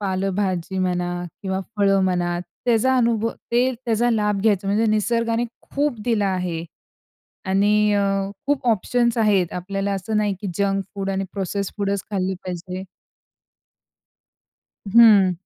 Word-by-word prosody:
पालेभाजी 190 Hz, -2 st, -1 dB
म्हणा 180 Hz, -1 st, 0 dB, 0.3 s
किंवा 190 Hz, 0 st, -2 dB, 0.2 s
फळं 195 Hz, -1 st, +3 dB
म्हणा 175 Hz, -1 st, 0 dB, 0.3 s
त्याचा 250 Hz, +2 st, +3 dB
अनुभव 230 Hz, -2 st, +2 dB, 0.2 s
ते 250 Hz, +2 st, +3 dB
त्याचा 235 Hz, +1 st, +1 dB
लाभ 210 Hz, -3 st, +1 dB
घ्यायचा. 200 Hz, -2 st, +2 dB
म्हणजे 215 Hz, +3 st, +2 dB
निसर्गाने 230 Hz, +2 st, +1 dB, 0.3 s
खूप 280 Hz, -5 st, -1 dB
दिलं 225 Hz, -4 st, +1 dB
आहे 180 Hz, -3 st, -2 dB, 0.8 s
आणि 205 Hz, +2 st, +3 dB
अ, 205 Hz, -, +2 dB, 0.5 s
खूप 285 Hz, -3 st, 0 dB
ऑप्शन्स 235 Hz, +2 st, +1 dB
आहेत. 205 Hz, -5 st, +3 dB
आपल्याला 195 Hz, +2 st, -3 dB
असं 205 Hz, +3 st, -2 dB
नाही, 210 Hz, -1 st, +1 dB
की 205 Hz, -, -4 dB
जंक 195 Hz, -1 st, +1 dB
फूड 195 Hz, 0 st, -3 dB
आणि 195 Hz, 0 st, -1 dB
प्रोसेस्ड 200 Hz, 0 st, -3 dB
फुडच 200 Hz, -1 st, -1 dB
खाल्ले 190 Hz, -2 st, -1 dB
पाहिजे. 180 Hz, +1 st, -5 dB, 2.0 s
हं. 205 Hz, -4 st, +7 dB
200 Hz, 130 wpm, -22 LUFS, 190-225 Hz, 2.0 s, हं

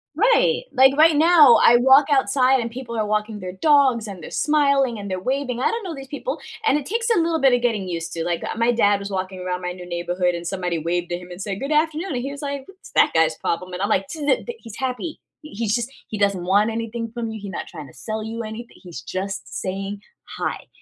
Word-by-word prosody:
Right, 475 Hz, +5 st, +3 dB
like, 265 Hz, +1 st, +5 dB
right 315 Hz, 0 st, +6 dB
now, 310 Hz, -5 st, +7 dB
I 240 Hz, -, +7 dB
walk 265 Hz, +3 st, +6 dB
outside 265 Hz, -1 st, +3 dB
and 235 Hz, -1 st, -3 dB
people 240 Hz, -2 st, -6 dB
are 215 Hz, -, 0 dB
walking 210 Hz, 0 st, -2 dB
their 185 Hz, -1 st, -6 dB
dogs 265 Hz, -2 st, +3 dB
and 195 Hz, -4 st, -8 dB
they're -, -, -9 dB
smiling 280 Hz, -5 st, +2 dB
and 200 Hz, -1 st, -6 dB
they're 185 Hz, -, -2 dB
waving- 255 Hz, 0 st, -2 dB
I 260 Hz, -, +2 dB
don't 460 Hz, 0 st, -3 dB
know 360 Hz, -4 st, -5 dB
these 270 Hz, -2 st, -9 dB
people- 295 Hz, -, -4 dB, 0.3 s
and 295 Hz, -, +4 dB
it 290 Hz, -, -5 dB
takes 465 Hz, +4 st, -1 dB
a -, -, +3 dB
little 330 Hz, -1 st, +1 dB
bit 270 Hz, -3 st, +4 dB
of 245 Hz, -, +2 dB
getting 220 Hz, -6 st, 0 dB
used 165 Hz, -1 st, -4 dB
to, 165 Hz, -, -3 dB
like, 170 Hz, 0 st, -2 dB
uh, -, -, -4 dB
my 230 Hz, +1 st, +3 dB
dad 205 Hz, -4 st, +3 dB
was 200 Hz, 0 st, -6 dB
walking 185 Hz, 0 st, -4 dB
around 180 Hz, 0 st, -3 dB
my 180 Hz, 0 st, -3 dB
new 180 Hz, 0 st, -10 dB
neighborhood, 175 Hz, +1 st, -1 dB
and 170 Hz, 0 st, -5 dB
somebody 180 Hz, -2 st, -2 dB
waved 175 Hz, +2 st, -2 dB
at 175 Hz, -, -2 dB
him 180 Hz, 0 st, -12 dB
and 180 Hz, +2 st, -8 dB
said, 195 Hz, 0 st, -4 dB
"Good 275 Hz, +2 st, -4 dB
afternoon." 315 Hz, +2 st, 0 dB
And 245 Hz, -, -2 dB
he 275 Hz, +2 st, -4 dB
was 285 Hz, -, -8 dB
like, 280 Hz, -2 st, -5 dB
"What's 385 Hz, 0 st, -16 dB
that -, -, +4 dB
guy's 160 Hz, -1 st, +2 dB
problem?" 180 Hz, +2 st, -3 dB
And 180 Hz, -, -5 dB
I'm 200 Hz, -, 0 dB
like, 195 Hz, -2 st, +1 dB
"To 315 Hz, -, -7 dB
the 390 Hz, -, +2 dB
the 475 Hz, -, -6 dB
He's 225 Hz, -3 st, -11 dB
happy, 265 Hz, +5 st, -4 dB, 0.2 s
he 305 Hz, -, -12 dB
he's 215 Hz, 0 st, -1 dB
just 240 Hz, +1 st, -3 dB, 0.2 s
he 215 Hz, -, -5 dB
doesn't 200 Hz, -3 st, +1 dB
want 205 Hz, +4 st, +3 dB
anything 230 Hz, 0 st, -4 dB
from 235 Hz, -1 st, -4 dB
you, 220 Hz, 0 st, -6 dB
he 200 Hz, -1 st, -7 dB
not 190 Hz, -, -5 dB
trying 150 Hz, -2 st, -9 dB
to -, -, -16 dB
sell 215 Hz, -, -5 dB
you 225 Hz, +1 st, -5 dB
anything, 220 Hz, +2 st, -8 dB
he's 170 Hz, -9 st, -9 dB
just 195 Hz, +8 st, -5 dB
saying 195 Hz, +2 st, -4 dB, 0.4 s
hi." -, -, -3 dB
230 Hz, 255 wpm, -22 LUFS, 185-275 Hz, 0.4 s, now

